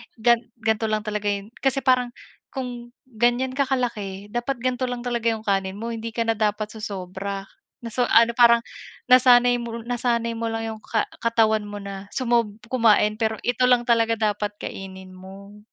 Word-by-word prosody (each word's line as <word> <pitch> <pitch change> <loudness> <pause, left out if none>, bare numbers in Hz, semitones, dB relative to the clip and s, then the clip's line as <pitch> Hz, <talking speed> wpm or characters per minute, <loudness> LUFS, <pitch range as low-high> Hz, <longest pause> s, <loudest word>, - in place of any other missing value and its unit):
gan 235 +1 +3 0.2
gan'to 220 -1 0
lang 215 -1 -1
talaga 210 -1 -3
'yon 200 +2 -2
kasi 270 0 0
parang 250 -2 +2 0.3
kung 245 -2 -7
ganyan 245 +1 0
ka 275 0 0
kalaki 210 -6 -3
dapat 240 +3 -2
ganto 255 0 0
lang 245 0 -4
talaga 235 -2 -1
'yong 220 -1 0
kanin 195 -2 0
mo 230 +3 -5
hindi 225 0 -6
ka 230 - +1
na 225 - +1
dapat 210 -1 -1
sosobra, 195 -2 -5 0.4
na 230 - -6
sa 245 +1 +1
ano, 230 +1 +5
parang 235 -1 +5 0.5
nasanay 245 -1 +6
mo 230 -1 -6
nasanay 235 -1 -1
mo 230 0 -3
lang 225 0 -3
'yong 220 - -8
ka 220 - -1 0.2
katawan 220 -2 +2
mo 205 -1 -7
na 200 0 -7
sumob 235 -5 +1 0.2
kumain 215 -3 +3
pero 220 -1 0
ito 250 +1 +2
lang 245 -1 +4
talaga 230 -1 +2 0.2
dapat 205 0 -4
kainin 190 -1 -8
mo. 195 +2 -12
230 Hz, 175 wpm, -23 LUFS, 210-240 Hz, 0.5 s, nasanay